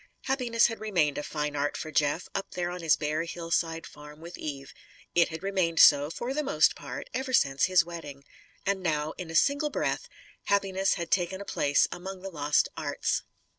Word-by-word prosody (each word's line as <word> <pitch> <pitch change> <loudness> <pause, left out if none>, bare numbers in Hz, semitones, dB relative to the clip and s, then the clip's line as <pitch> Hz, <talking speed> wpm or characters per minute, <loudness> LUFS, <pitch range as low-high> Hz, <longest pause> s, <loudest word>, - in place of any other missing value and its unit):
Happiness 250 -4 +2
had 225 -1 -1
remained 175 -9 +1
a - - -4
fine 150 -1 -3
art 145 +1 -1
for 155 - -6
Jeff, 150 +3 +1
up 195 - -4
there 175 -1 -1
on 180 0 -6
his 160 -2 +4
bare 155 +1 -1
hillside 165 -1 -2
farm, 150 0 -12
with 170 +2 -9
Eve. 140 -2 -6 0.4
It 170 -1 +4
had 160 +1 -7
remained 185 -4 0
so, 145 +1 +7
for 240 +10 -4
the 300 - 0
most 280 - +3
part, - - -7
ever 260 0 -3
since 135 - +3
his 185 -2 +4
wedding. 160 -5 -8 0.4
And 195 -1 0
now, 155 -3 0
in 180 -3 -6
a 165 - -6
single 285 - +3
breath, - - -2 0.4
happiness 195 -1 +1
had 170 -2 -5
taken 190 +1 +1
a 200 - -7
place 145 -6 +2
among 190 +1 -7
the 195 - -5
lost 150 -2 +2
arts. - - -1
170 Hz, 195 wpm, -28 LUFS, 150-195 Hz, 0.4 s, so